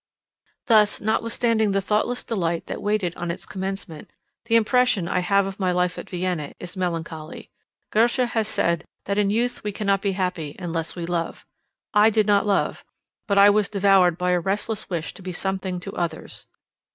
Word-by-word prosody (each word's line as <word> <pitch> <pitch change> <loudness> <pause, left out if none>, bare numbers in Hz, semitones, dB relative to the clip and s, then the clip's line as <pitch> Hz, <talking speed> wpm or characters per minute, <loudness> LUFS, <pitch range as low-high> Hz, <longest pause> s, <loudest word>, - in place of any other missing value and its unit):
Thus, 215 -3 +4
notwithstanding 220 0 +1
the 195 - +2
thoughtless 210 +5 0
delight 170 -7 -2
that - - -6
waited 205 -4 0
on 175 - -4
its 170 - -5
commencement, 190 -4 -6 0.4
the 230 -1 +2
impression 230 -4 +3
I 180 - +1
have 200 +2 +2
of 195 +1 -6
my 185 -2 +1
life 180 0 0
at - - -9
Vienna 180 -5 -3
is 180 +1 -8
melancholy. 165 -3 -4 0.4
Goethe 230 +2 +3
has 225 -2 0
said, 170 -5 0 0.2
that 200 +1 0
in 200 -1 +2
youth 235 +4 0
we 210 - -2
cannot 200 -1 0
be 200 -1 0
happy 180 -6 -3
unless 165 -2 -4
we 175 -2 -4
love. 170 -1 -3 0.5
I 210 +1 +6
did 215 -1 +2
not 205 0 +3
love; 200 -2 0 0.4
but 200 -2 +1
I 200 +1 +8
was 210 0 +1
devoured 195 -4 +4
by 180 0 0
a 180 - +3
restless 205 +4 -2
wish 170 -4 -3
to - - -12
be 185 0 -5
something 190 0 -3
to 195 +2 -7
others. 170 -2 -4
195 Hz, 180 wpm, -24 LUFS, 175-210 Hz, 0.5 s, I